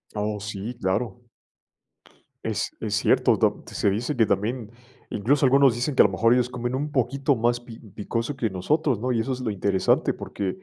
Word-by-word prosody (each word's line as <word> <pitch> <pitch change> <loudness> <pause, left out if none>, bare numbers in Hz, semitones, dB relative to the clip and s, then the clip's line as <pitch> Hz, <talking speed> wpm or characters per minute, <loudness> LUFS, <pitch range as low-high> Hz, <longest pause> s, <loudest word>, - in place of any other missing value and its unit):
Oh, 105 0 -2
sí, 110 +2 -5
claro. 110 +5 -2 1.2
Es - - -2
es - - -2
cierto, - - +3
ta - - -1
se - - +1
dice 120 +9 -1
que 115 - +4
también, 110 +2 -2 0.4
incluso 135 +7 +2
algunos 135 -1 +5
dicen 130 +4 -2
que, - - +7
a - - +3
lo 95 - +2
mejor, 115 +5 +3
ellos 125 -1 +2
comen 120 0 -3
un 145 +3 -3
poquito 135 +1 +1
más 120 +1 +1
pi 115 -2 -12
picoso 115 +6 -4
que 115 -5 -1
nosotros, 130 - 0
¿no? 125 +2 -1
Y 115 - +1
eso 130 +3 -1
es 125 - -5
lo 120 - -2
interesante, 100 -1 +1
porque, 100 -2 -4
120 Hz, 190 wpm, -25 LUFS, 105-130 Hz, 1.2 s, que